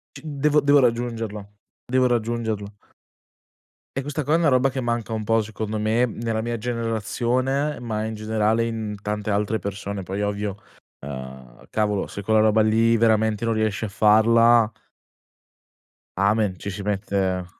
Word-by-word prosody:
C - - -10
devo 150 0 +2
devo 145 0 +5
raggiungerlo, 115 -4 -1 0.3
devo 130 0 +2
raggiungerlo. 110 -3 -2 1.2
E - - 0
questa 145 +2 -3
qua 150 +4 +2
è - - +4
una 170 -1 +2
roba 130 -1 +3
che 135 - -4
manca 120 -2 -2
un 110 -1 -3
po' 115 +1 +3
secondo 110 0 -4
me 110 +3 +2
nella 115 -1 -3
mia 120 +1 -3
generazione, 120 +5 -1
ma 110 -2 -3
in 110 - -4
generale 110 +1 +1
in 110 -2 -4
tante 105 0 -3
altre 105 +2 0
persone. 100 +1 -5
Poi 95 +3 -4
ovvio, 105 -1 -2 0.5
uhm, 65 -3 -9
cavolo, 105 -2 0
se 100 - -7
quella 110 +2 +3
roba 110 0 +4
lì 115 +2 +3
veramente 110 -1 +2
non 115 - +1
riesci 110 -1 -1
a 110 - -2
farla 115 +2 +5 1.5
amen, 100 0 +2
ci - - -5
si 100 +1 -6
mette 95 -3 -1
110 Hz, 155 wpm, -23 LUFS, 105-120 Hz, 1.5 s, devo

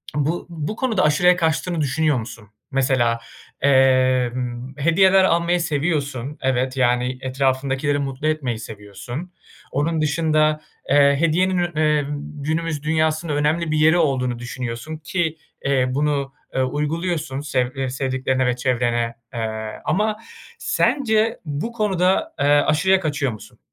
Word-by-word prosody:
bu 150 +4 -1
bu 165 +5 -4
konuda 225 -8 0
aşırıya 175 +4 +4
kaçtığını 165 0 0
düşünüyor 150 0 +1
musun? 110 -2 -9 0.2
Mesela, 130 -3 +2 0.4
emm, 130 -2 +2
hediyeler 190 +5 +4
almayı 170 0 +2
seviyorsun 145 -4 -2
evet, 130 0 0
yani, 125 0 +1
etrafındakileri 135 +2 0
mutlu 135 +2 -3
etmeyi 130 -8 -1
seviyorsun. 110 - -8 0.4
Onun 155 +3 0
dışında, 155 0 +2 0.3
eee, 140 0 +5
hediyenin 180 +3 +2
ün 175 -2 -1
emm, 150 -2 +1 0.3
günümüz 160 -1 -2
dünyasının 155 0 0
önemli 155 +2 0
bir 155 - +1
yeri 160 +3 +5
olduğunu 130 -6 0
düşünüyorsun 120 +4 -5
ki, 160 0 -2 0.3
eee, 135 -2 +2
bunu, 140 0 -1 0.2
ııı, 130 0 +2
uyguluyorsun 150 +1 -2
sev, 130 -3 -1
ııı, 135 -1 -1
sevdiklerine 130 0 -1
ve 125 - +1
çevrene, 120 -2 0 0.2
eee, 110 -2 -4
ama 210 +6 +1 0.4
sence 225 -4 +1
bu 150 +10 -3
konuda, 205 - +1
eee, - - +1
aşırıya 155 +6 +4
kaçıyor 145 -6 -1
musun? 110 - -12
145 Hz, 125 wpm, -21 LUFS, 130-165 Hz, 0.4 s, eee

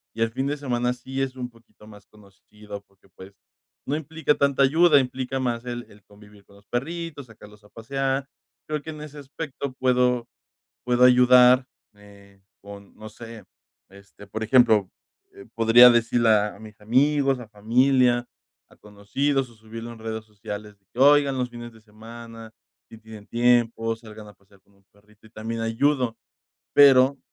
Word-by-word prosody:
y 115 - -6
el 115 - -2
fin 130 +4 -3
de 145 - -2
semana 125 -3 -2
sí 130 +2 -6
es 130 -1 -3
un 125 -1 -6
poquito 115 -2 -22
más 105 -2 -15
conocido, 105 0 -14
porque, 100 0 -30
pues, 95 +2 -14 0.5
no 140 - -2
implica 160 0 -1
tanta 140 -1 +1
ayuda, 155 +2 +4
implica 130 0 -3
más 120 -2 -3
el 120 -1 -6
el 100 0 -20
convivir 105 -1 -19
con 100 - -22
los 100 0 -21
perritos, 155 +3 -5
sacarlos 105 -1 -17
a - - -20
pasear, 135 +4 -3 0.4
creo 150 -1 -3
que 160 - -8
en 150 -1 -10
ese 150 -1 -10
aspecto 140 -1 -7
puedo 125 -2 +1 0.6
puedo 125 0 +1
ayudar, 125 0 +6 0.3
eh, 100 -1 -19 0.2
con, 100 0 -13
no 110 0 -11
sé, 115 0 -12 0.5
este, 100 +1 -17
por 110 +3 -5
ejemplo, 110 -4 +4 0.5
eh, 395 0 -14
podría 115 +2 +7
decirle 120 0 +2
a 105 -1 +2
a 100 - -17
mis 110 -1 -14
amigos, 135 +4 +1
a 120 - -10
familia, 120 +3 +1 0.4
a - - -21
conocidos, 125 +7 -3
o 115 - -19
subirlo 115 +2 -10
en 115 - -15
redes 110 0 -6
sociales, 105 -1 -9
de 100 - -45
que: 125 - -9
"Oigan 140 -1 +4
los 125 -1 -2
fines 120 0 -10
de 110 - -19
semana, 115 +1 -12 0.4
si 115 - -13
tienen 110 -2 -13
tiempo, 115 -1 +1
salgan 110 -2 -13
a 105 - -14
pasear 100 0 -27
con 100 - -32
un 100 0 -30
perrito", 105 +1 -26
y - - -23
también 115 +1 -6
ayudo, 120 +1 0 0.6
pero 135 -1 +6
115 Hz, 175 wpm, -23 LUFS, 105-130 Hz, 0.6 s, podría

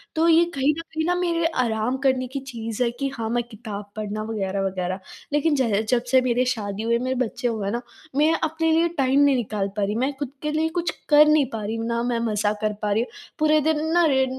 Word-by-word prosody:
तो 320 +1 +3
ये 335 0 +6
कहीं 275 +2 +3
न - - -3
कहीं 315 -1 -4
ना 355 +1 +2
मेरे 340 -2 0 0.2
आराम 225 +2 -1
करने 260 -1 +2
की 270 +3 -4
चीज़ 230 -2 -5
है 240 - +2
कि 275 - 0
हाँ 225 -1 -3
मैं 240 +1 0
किताब 210 -2 -7
पढ़ना 215 0 -4
वगैरह-वगैरह। 195 -3 -2 0.3
लेकिन 295 +1 +2
ज 225 -6 +1
जब 245 -1 +2
से 260 -1 +6
मेरी 250 0 +1
शादी 210 -4 -2
हुई, 235 +1 +2
मेरे 255 +1 -1
बच्चे 245 0 -1
हुए 215 -4 -2
ना 240 +2 -2 0.3
मैं 305 +3 +4
अपने 320 +1 +1
लिए 330 +1 +4
टाइम 270 0 +3
नहीं 285 -1 +5
निकाल 215 -5 -1
पा 205 - +1
रही। 205 +1 -1
मैं 260 +5 0
खुद 285 -3 -3
के 300 - -1
लिए 315 +1 +1
कुछ 345 -1 0 0.2
कर 300 0 +8
नहीं 305 -2 +4
पा 220 -1 -3
रही 215 +2 -3
हूँ 225 0 -3
ना 235 0 0
मैं 240 -1 0
मज़ा 210 -1 +1
कर 215 -1 0
पा 210 - 0
रही 210 +2 +2
हूँ, - - -9 0.3
पूरे 310 0 +4
दिन 315 -1 +1
ना 345 0 +5
य 265 -1 +3
250 Hz, 240 wpm, -24 LUFS, 215-300 Hz, 0.3 s, कर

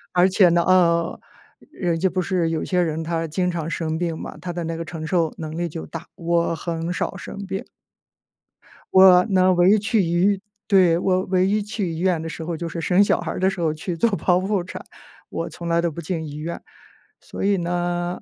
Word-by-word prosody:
而 180 +1 +5
且 190 0 +5
呢， 170 0 +3
呃， 170 -2 +3 0.5
人 170 -3 -1
家 190 +2 +2
不 185 +1 -1
是 180 -3 0
有 160 -1 -2
些 180 -1 +1
人 160 -1 -1
他 165 0 -2
经 180 +3 -1
常 165 -2 -3
生 160 -1 -2
病 165 -1 -2
嘛， - - -8
他 175 - -5
的 175 0 -4
那 165 0 -4
个 165 - -5
承 160 -1 -6
受 165 -1 0
能 160 0 -5
力 175 0 -1
就 165 0 -7
大。 165 +1 -8
我 170 -1 0
很 165 +1 -4
少 - - -3
生 - - -8
病。 195 0 -4 1.3
我 185 -1 +7
呢， 185 -3 +3
唯 175 +2 +5
一 215 - +6
去 220 +1 +1
医 185 +3 +1 0.3
对， 185 -4 +5
我 185 +1 +1
唯 185 0 +2
一 205 +2 +1
去 205 -4 -3
医院 170 0 0
的 165 - -5
时 165 - -7
候， 170 +1 -3
就 170 +1 -4
是 170 - -5
生 180 +4 +3
小 - - +2
孩 - - -4
儿 - - -5
的 190 +1 +3
时 195 - -6
候 160 -2 +1
去 170 +3 -5
做 230 +8 +2
剖 180 -2 +2
腹 200 -2 0
产。 180 - -8 0.5
我 - - -4
从 170 - -8
来 170 0 +2
都 170 - 0
不 165 - -8
进 160 0 -3
医院， 150 +3 -6 0.6
所 - - -7
以 200 0 +3
呢， 175 0 -2
175 Hz, 240 characters per minute, -22 LUFS, 165-185 Hz, 1.3 s, 我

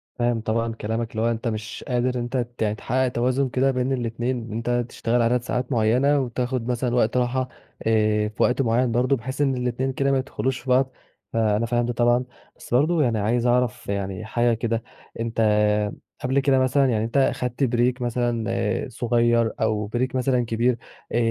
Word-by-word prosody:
فاهم 120 -2 0
طبعًا 115 +1 -1
كلامك، 115 +1 -3
اللي 110 - -3
هو 115 +1 +2
أنت 115 +1 -3
مش 110 -1 -4
قادر، 125 0 0
أنت 120 +2 -2
ت 120 -1 -4
يعني 105 -1 +1
تحقَّق 130 +4 0
توازُن 125 +2 0
كده 135 +2 +2
بين 130 +1 0
الإتنين، 120 -1 -2
أنت 120 +2 -1
تشتغل 120 +1 0
عدد 120 +1 +2
ساعات 125 +1 -3
معيَّنة 125 +5 +3
وتاخد 125 -1 -2
مثلًا 125 0 0
وقت 120 0 +2
راحة، 125 +1 0 0.4
آآ 105 -1 +2
في 105 - -1
وقت 125 +2 +2
معيَّن 120 0 +2
برضه، 125 +4 +2
بحيث 130 +4 -5
إن 135 -2 +2
الإتنين 125 +2 -1
كده 140 +1 +1
ما 135 - +3
يدخلوش 130 -1 -2
في 130 - -9
بعض، 130 +1 +3 0.4
فأنا 110 0 +2
فاهم 120 0 +1
ده 120 - -2
طبعًا، 120 +1 +2 0.3
بس - - -9
برضه 155 +5 +3
يعني 115 -4 +1
عايز 115 +4 +1
أعرف 125 -2 +1
يعني، 100 0 -3
حاجة 120 +2 +1
كده. 115 0 -1 0.4
أنت 115 0 -1 0.8
قبل 130 +2 +2
كده 135 -1 +3
مثلًا 130 +2 +3
يعني، 110 -3 +1
أنت 115 - -2
أخدت 125 -1 +1
بريك 125 0 +1
مثلًا 120 -2 -1
صغير 120 -1 +2
أو 110 -2 0
بريك 125 +4 -2
مثلًا 125 -1 +1
كبير، 115 +2 +1 0.3
آآ - - 0
120 Hz, 185 wpm, -24 LUFS, 115-130 Hz, 0.8 s, معيَّنة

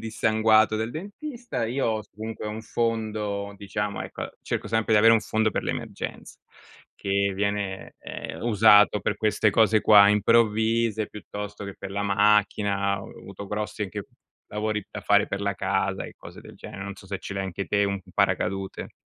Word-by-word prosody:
dissanguato 110 0 +3
del 110 +2 -2
dentista 205 - -5
io 120 -1 0
us 110 - -10
comunque 110 0 -6
ho - - -3
un 110 +1 -6
fondo, 110 -3 -2
diciamo 100 +1 -3
ecco, - - -6
cerco - - -3
sempre 110 0 +1
di - - +6
avere 115 +2 +7
un 110 - +3
fondo 110 0 0
per - - -3
l'emergenze, - - -5 0.6
che 100 0 0
viene, 100 -1 -2
ehm, - - -7
usato 105 -2 +5
per 100 - -1
queste 110 0 +2
cose 110 +1 +4
qua 100 -1 +7
improvvise, 110 +1 +2
piuttosto 105 0 -7
che 100 - -7
per 100 - -7
la 100 +1 -2
macchina; 100 -1 +2
ho - - -10
avuto 100 +1 -9
grossi 105 +1 -3
anche 95 -4 -5 0.4
lavori 105 -1 -2
da - - -6
fare 100 0 +3
per 100 - -4
la 100 0 -1
casa, - - -1
e - - -10
cose - - -12
del - - -13
genere. 95 - -8
Non 100 - -6
so 95 - -15
se 100 0 -4
ce - - -7
l'hai 95 - -2
anche 95 +1 -4
te 100 0 +2
un 100 -1 -2
paracadute. 95 0 -1
105 Hz, 175 wpm, -25 LUFS, 100-110 Hz, 0.6 s, avere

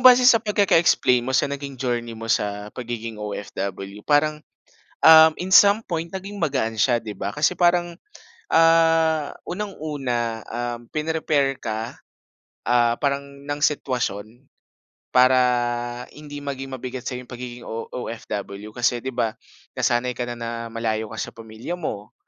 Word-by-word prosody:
base 250 0 +8
sa 230 -3 +6
pagkaka-explain 175 - +3
mo 125 - -4
sa - - +3
naging 140 -1 -6
journey 120 -2 -2
mo 115 0 -7
sa 105 -1 -1
pagiging 115 -3 -5
OFW. 100 -1 -5
Parang, 150 +2 +2 0.6
um, 160 0 +9
in 185 +1 -2
some 205 +3 +7
point, 170 -2 -3
naging 195 +2 -7
magaan 135 -8 0
siya 120 +2 +4
'di 110 -2 -6
ba. 100 0 -4
Kasi 150 +4 +2
parang, 175 -1 +2 0.6
ah, 165 -2 +4
unang 200 +2 -5
una, 120 -7 -2
um, 120 0 -4
pin-prepare 150 -3 0
ka, 110 +1 -4 0.7
ah, 120 -1 +4
parang, 140 -1 0 0.2
ng 145 0 -3
sitwasyon 125 -5 -1 0.7
para 130 +1 +6 0.8
hindi 145 -1 -8
maging 135 -1 -5
mabigat 130 0 -6
sa'yong 125 -1 -5
pagiging 120 -1 -8
O 115 +1 -5
OFW. 105 -4 -6
Kasi 120 0 +1
'di 130 - -3
ba, 115 -3 0 0.4
nasanay 120 +1 +1
kana 120 -1 -3
na 115 0 -4 0.2
malayo 110 -1 -2
ka - - -8
sa - - -4
pamilya 115 +8 -6
mo. 105 -10 -5
125 Hz, 140 wpm, -23 LUFS, 115-155 Hz, 0.8 s, um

